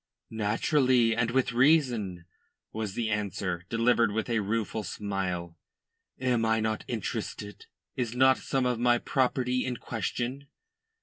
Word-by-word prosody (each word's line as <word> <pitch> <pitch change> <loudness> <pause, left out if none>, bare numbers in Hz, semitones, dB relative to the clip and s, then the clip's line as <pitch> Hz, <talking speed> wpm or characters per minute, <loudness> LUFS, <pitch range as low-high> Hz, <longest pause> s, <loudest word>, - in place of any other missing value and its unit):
"Naturally, 115 +2 +2
and 115 0 +1
with 125 0 +1
reason," 120 - +2 0.5
was 110 -3 -4
the 115 -2 -1
answer, 95 -4 -2
delivered 115 -1 +3
with 110 +3 -2
a 115 - +2
rueful 110 +1 -1
smile. 90 -4 -4 0.6
"Am 125 -3 +1
I 110 0 +2
not 110 0 -1
interested? 105 0 -5 0.3
Is 120 -2 -2
not 130 +1 +5
some 135 -2 -1
of 125 -2 0
my 120 0 +4
property 125 -1 0
in 125 -1 -3
question?" 125 +5 -4
115 Hz, 130 wpm, -28 LUFS, 105-125 Hz, 0.6 s, not